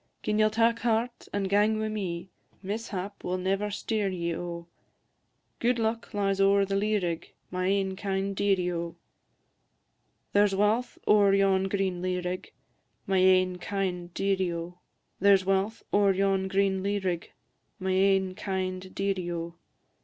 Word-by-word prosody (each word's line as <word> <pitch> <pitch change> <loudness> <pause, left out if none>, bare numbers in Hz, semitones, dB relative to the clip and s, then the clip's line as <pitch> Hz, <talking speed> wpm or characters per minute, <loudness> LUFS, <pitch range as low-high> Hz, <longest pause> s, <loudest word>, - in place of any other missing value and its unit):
Gin 210 0 0
ye'll 215 0 +5
tak 230 +2 +2
heart, 235 +1 -1
and 200 -1 -1
gang 210 +2 +3
wi' 220 0 -1
me, 190 -4 -4 0.3
Mishap 200 -1 -5
will 180 +1 -1
never 195 +3 0
steer 210 0 -1
ye, 170 -2 -2
O; 170 0 -5 0.9
Gude 240 +1 +2
luck 225 0 -2
lies 195 -1 0
ower 200 0 +4
the 195 0 -2
lea 210 +2 +2
rig, 170 -4 -3 0.2
My 185 0 -1
ain 195 -1 +1
kind 195 0 -2
dearie, 190 -3 +1
O! 170 -1 -4 1.4
There 205 +1 +5
's 195 - -2
walth 215 +5 +1
ower 200 -2 +5
yon 195 -1 +3
green 190 -2 -1
lea 180 0 -1
rig, 180 +1 -4 0.5
My 190 -1 +2
ain 185 -1 +4
kind 180 -2 -3
dearie, 190 -2 +1
O! 170 +1 -6 0.4
There 200 +1 +6
's 190 - -8
walth 195 +3 0
ower 200 -1 +4
yon 195 0 +1
green 190 0 +1
lea 200 +1 0
rig, 180 -4 -3 0.5
My 190 0 -2
ain 190 0 +3
kind 185 -1 -4
dearie, 195 -3 -1
O! 170 0 -4
195 Hz, 155 wpm, -28 LUFS, 185-205 Hz, 1.4 s, There